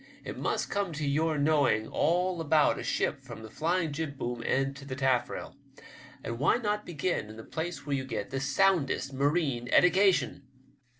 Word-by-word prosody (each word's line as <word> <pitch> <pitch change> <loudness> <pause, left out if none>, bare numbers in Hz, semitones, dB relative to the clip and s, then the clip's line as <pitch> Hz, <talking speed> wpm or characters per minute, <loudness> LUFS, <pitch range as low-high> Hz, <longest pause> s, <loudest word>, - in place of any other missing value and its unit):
It - - -6
must - - -2
come 200 -4 -1
to 150 -1 -3
your 155 +2 +1
knowing 145 -7 +2
all 175 +2 +1
about 155 -1 +3
a - - -5
ship - - -1
from 110 - -10
the 110 - -10
flying 165 0 0
jibboom 140 -6 -4
end 135 +1 +1
to 140 - -11
the 130 -2 -5
tafifrail, 130 -2 -1 0.7
and 115 +1 -4
why 145 - +3
not 210 -3 -2
begin 170 -7 -2
in 110 - -10
the 110 - -8
place 165 +4 -5
where 145 -1 0
you 130 - -2
get 130 - -4
the 135 - -2
soundest 140 -1 +1
marine 140 -3 0
eddication? 190 +2 +4
145 Hz, 175 wpm, -29 LUFS, 135-175 Hz, 0.7 s, eddication